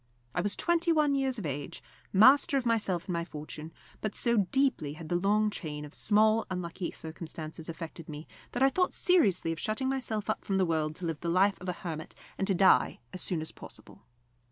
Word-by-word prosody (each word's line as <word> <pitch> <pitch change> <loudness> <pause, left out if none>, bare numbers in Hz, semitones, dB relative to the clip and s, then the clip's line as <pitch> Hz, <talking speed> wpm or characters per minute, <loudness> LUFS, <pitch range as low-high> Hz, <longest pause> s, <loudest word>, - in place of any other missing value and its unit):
I 180 - 0
was 205 +2 0
twenty 345 0 +2
one 305 -3 +3
years 270 -2 0
of 205 - -5
age, 145 -1 -5 0.3
master 265 +7 +6
of 260 - -1
myself 205 -7 +1
and - - -5
of - - 0
my - - -2
fortune; 155 -1 -8 0.3
but 215 - -3
so 235 -1 +2
deeply 265 - +1
had 155 +1 -9
the 175 - +1
long 210 +4 +2
chain 150 -6 -5
of 145 - -12
small 220 +1 +3
unlucky 180 -1 -4
circumstances 160 0 -5
affected 165 0 -7
me, 150 +1 -7 0.3
that 250 - +1
I 270 - +7
thought 365 +6 0
seriously 205 - +3
of 165 - -4
shutting 220 +5 -1
myself 235 -6 -1
up 215 - -1
from 195 - 0
the 190 - +3
world 155 -2 0
to 180 - -6
live 165 -3 -2
the 170 - -3
life 195 +3 +3
of 185 - -4
a - - 0
hermit, 160 -2 -5 0.2
and 195 - -2
to 195 - +2
die 190 +1 +4
as 185 - -5
soon 170 -4 -1
as 160 - -4
possible. - - -11
185 Hz, 215 wpm, -30 LUFS, 165-230 Hz, 0.3 s, I